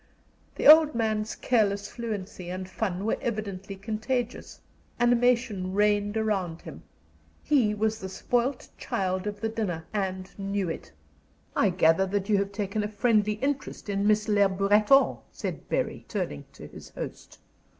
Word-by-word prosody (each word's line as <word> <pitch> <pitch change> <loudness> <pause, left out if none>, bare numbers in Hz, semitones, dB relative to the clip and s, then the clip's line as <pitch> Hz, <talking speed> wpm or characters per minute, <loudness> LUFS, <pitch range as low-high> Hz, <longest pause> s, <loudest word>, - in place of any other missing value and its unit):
The - - -3
old 310 -1 +8
man's 220 -1 -1
careless 205 -4 +1
fluency 210 -6 -6
and 185 +1 -5
fun 190 -1 -3
were 225 - 0
evidently 200 -3 -4
contagious; 230 +4 -3 0.4
animation 240 -5 +2
reigned 205 0 +2
around 195 -7 -1
him; - - -9 0.6
he 240 -8 +2
was 220 +1 0
the 190 - -6
spoiled 245 +7 -1
child 185 0 -2
of 205 0 -5
the 225 - 0
dinner, 190 -8 -3
and 190 -2 -2
knew 195 -2 -1
it. 80 - -6 0.6
"I - - +3
gather 175 +1 +3
that 200 +1 -2
you 205 - +4
have 200 0 -2
taken 205 +1 -2
a - - -1
friendly 215 0 +2
interest 270 0 -3
in 200 0 0
Miss 210 0 +3
Le 205 -2 +4
Breton," 210 +7 +4
said - - -6
Bury, - - -1
turning - - -4
to - - -11
his - - -11
host. - - -8
210 Hz, 150 wpm, -27 LUFS, 195-225 Hz, 0.6 s, old